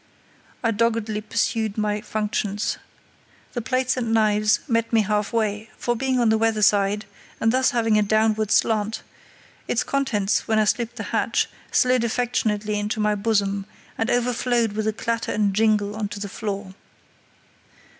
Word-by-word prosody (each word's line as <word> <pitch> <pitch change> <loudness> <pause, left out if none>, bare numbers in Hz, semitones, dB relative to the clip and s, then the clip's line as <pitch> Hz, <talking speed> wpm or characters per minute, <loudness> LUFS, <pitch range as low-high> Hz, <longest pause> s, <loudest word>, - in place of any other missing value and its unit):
I 230 - +2
doggedly 225 -1 0
pursued 220 0 -1
my 210 -1 0
functions. 210 -1 -2 0.7
The 240 - -2
plates 255 +2 0
and 235 -3 -2
knives 215 -1 +3
met 230 -3 0
me 225 -2 +4
half 210 0 -1
way, 220 -1 -1
for, 240 - -1
being 260 +1 0
on 235 -2 +3
the 220 0 +3
weather 225 -1 +1
side, 205 +1 +3 0.3
and 225 - +3
thus 260 0 +3
having 225 -3 +2
a - - +3
downward 215 0 +2
slant, 215 0 +1 0.6
its 235 - +1
contents, 220 -8 0
when 220 -1 +2
I 215 - +4
slipped 235 +2 0
the - - -5
latch, - - +1 0.2
slid 255 -1 +3
affectionately 220 -3 0
into 210 +1 -2
my 210 0 +2
bosom, 200 -2 0 0.3
and 225 +1 -1
overflowed 240 -1 +1
with 215 +1 -2
a 220 - +1
clatter 230 0 -2
and 205 -2 +1
jingle 210 -1 +2
on 215 -1 -2
to 205 0 -7
the 200 - -4
floor. 200 -2 -5
220 Hz, 160 wpm, -23 LUFS, 210-230 Hz, 0.7 s, me